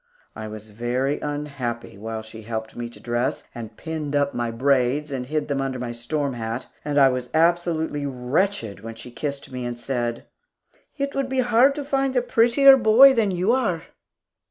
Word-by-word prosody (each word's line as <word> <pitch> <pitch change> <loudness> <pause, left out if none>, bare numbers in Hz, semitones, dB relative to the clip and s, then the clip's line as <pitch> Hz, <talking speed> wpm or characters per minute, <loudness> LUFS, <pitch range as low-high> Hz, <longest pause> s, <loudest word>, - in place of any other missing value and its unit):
I 110 - -6
was 110 0 -9
very 125 +6 -1
unhappy 145 -5 -4
while 110 +2 -5
she 110 0 -10
helped 110 0 -5
me 120 0 -5
to - - -15
dress, 120 +1 -1
and 115 -2 -8
pinned 155 -3 -4
up 145 -1 +1
my 120 -1 -1
braids, 135 +4 +1
and 125 -2 -4
hid 150 +1 -1
them 140 -2 -1
under 135 -1 -2
my 125 -1 -4
storm 140 +4 -2
hat; 115 +1 -4 0.2
and 145 -1 -2
I 135 -1 +7
was 125 -1 -3
absolutely 160 -3 +1
wretched 125 - -1
when 115 0 -8
she 120 +2 -10
kissed 140 +3 -5
me 125 -1 -5
and 120 0 -4
said, 120 -2 -3 0.7
"It 280 0 -2
would 275 -1 -1
be 260 -1 +1
hard 245 +3 +4
to 295 - -4
find 270 -1 0
a 250 - +2
prettier 245 +3 +6
little - - -1 0.2
boy 270 +2 +10
than 225 -5 +2
you 185 +3 +1
are." 230 -11 0
140 Hz, 190 wpm, -23 LUFS, 120-175 Hz, 0.7 s, boy